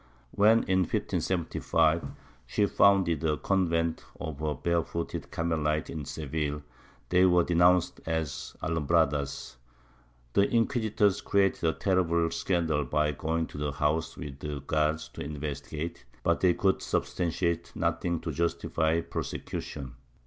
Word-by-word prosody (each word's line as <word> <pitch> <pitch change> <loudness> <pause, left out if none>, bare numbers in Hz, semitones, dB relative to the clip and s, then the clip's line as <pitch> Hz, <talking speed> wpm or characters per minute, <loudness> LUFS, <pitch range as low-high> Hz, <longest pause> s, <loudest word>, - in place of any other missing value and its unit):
When, 110 +3 +5
in 95 -1 +2
1575, 85 -2 +1 0.4
she 105 - +2
founded 95 -6 +3
a 75 -2 +1
convent 85 -4 0 0.2
of 80 -4 -5
her 75 -1 -1
Barefooted 85 +2 -2
Carme 85 -2 -1
lites 75 +1 0
in 75 -4 -5
Seville, 75 0 -3 0.5
they 90 +1 +4
were 90 -1 +4
denounced 90 +1 +3
as 80 -3 -3
Alumhradas; 75 -4 0 0.8
the 100 - +4
inquis 115 -1 +1
itors 100 -1 +2
created 100 -3 +2
a - - 0
terrible 85 -3 +1
scandal 80 -5 0
by 75 +3 +1
going 80 +3 -1
to 75 - -9
the 75 -1 -2
house 75 +2 0
with 70 -4 -7
the 75 -2 -5
guards 75 +2 0
to - - -9
investigate, 75 +2 -5 0.2
but - - +2
they 90 -2 +3
could 95 -1 +1
substantiate 85 -1 -1
nothing 85 0 0
to 85 - -3
justify 80 0 0
prosecution. 70 -5 -5
80 Hz, 130 wpm, -29 LUFS, 75-90 Hz, 0.8 s, When